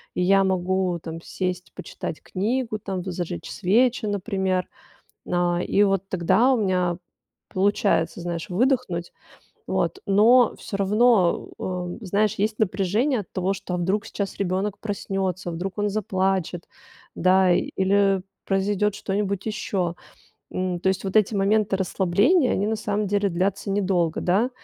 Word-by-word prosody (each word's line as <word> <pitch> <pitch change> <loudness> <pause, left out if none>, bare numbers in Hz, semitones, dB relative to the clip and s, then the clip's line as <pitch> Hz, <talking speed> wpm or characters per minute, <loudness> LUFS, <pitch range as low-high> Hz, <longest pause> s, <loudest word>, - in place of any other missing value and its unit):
и - - 0
я 195 +2 +4
могу, 185 -1 0
там, 165 0 -7
сесть 180 0 -4
почитать - - -7
книгу, 220 +3 -2
там 190 -2 -4
бы 185 +1 -5
зажечь 170 - -5
свечи, 230 +5 +2
например. 190 -2 -1 0.6
А, 175 -1 +1
и 200 - +2
вот 195 -1 +1
тогда 205 +9 +3
у - - +2
меня 180 -3 +1 0.5
получается, 195 -3 +1
знаешь, 170 -1 -4
выдохнуть. 200 -4 0 0.6
Вот, 390 - 0
но 225 +4 +5
всё 200 - -5
равно, 205 -2 +3
э 180 -1 -4
э, - - -7
знаешь, 205 +2 +1
есть 215 +2 -1
напряжение 215 +6 +1
от 200 - -11
того, 185 +1 0
что, 195 -2 -5
а - - +1
вдруг 190 +5 -1
сейчас 200 -2 -4
ребёнок 195 +1 -1
проснётся, 195 -3 -3
вдруг 180 +3 -4
он 205 0 +1
заплачет, 190 -4 -1 0.5
да, 185 +1 +4
или 195 0 +2 0.2
произойдёт 200 +1 +1
что-нибудь 200 -1 -2
ещё. 190 -5 -2 0.6
М, 185 -1 -2
то 185 - -1
есть, 190 0 -1
вот 195 0 -4
эти 215 0 +4
моменты 200 +1 +2
расслабления, 200 - +2
они 200 - 0
на 220 - 0
самом 210 -1 -1
деле 200 0 +1
длятся 190 +3 -1
недолго, 185 -5 0
да. 200 +8 +2
195 Hz, 145 wpm, -24 LUFS, 180-210 Hz, 0.6 s, но